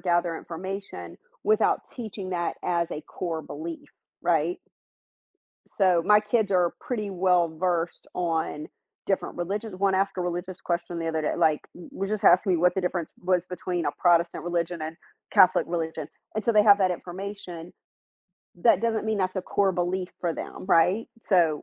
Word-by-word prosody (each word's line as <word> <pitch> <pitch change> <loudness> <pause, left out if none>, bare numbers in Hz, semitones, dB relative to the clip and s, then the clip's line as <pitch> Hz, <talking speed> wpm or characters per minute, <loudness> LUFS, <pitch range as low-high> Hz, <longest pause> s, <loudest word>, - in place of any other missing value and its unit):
gather 175 -2 +1
information 190 +5 -7 0.3
without 435 0 +3
teaching 215 -6 -6
that 175 -2 -1
as 170 -1 0
a 150 - -4
core 165 -2 -4
belief 160 +3 -7 0.3
right? 170 0 +1 1.1
so 185 -4 +2
my 210 0 +6
kids 210 -1 +1
are 180 -2 +3
pretty 210 -5 -3
well 180 -2 +3
versed 175 -1 -1
on 160 -3 -1 0.4
different 195 - -1
religions 195 +3 -3
one 195 0 +2
asked 195 0 +1
a - - -2
religious 175 +1 -4
question 170 0 -2
the 165 - -3
other 160 -1 0
day, 155 - -1
like, 160 -3 +3
w 175 - -11
was 195 - -3
just 215 -2 -2
asking 185 +1 +6
me 175 - +3
what 180 +2 +3
the 190 - 0
difference 180 -2 -2
was 180 -1 +1
between 180 -2 -3
a - - +1
Protestant 170 -1 +3
religion 170 -1 -1
and 160 +1 -5 0.3
Catholic 185 -3 +5
religion. 160 -3 -3 0.3
And 215 - -1
so 235 - +2
they 210 -1 +6
have 205 -1 +7
that 185 -1 +3
information. 180 -1 -6 0.8
That 175 +1 +4
doesn't 225 -1 0
mean 220 -1 0
that's 185 0 -1
a 190 - -1
core 195 +1 +1
belief 180 +1 -1
for 170 -2 0
them - - -7
right? 185 +5 +4 0.2
So 165 -6 +4
180 Hz, 170 wpm, -26 LUFS, 170-195 Hz, 1.1 s, have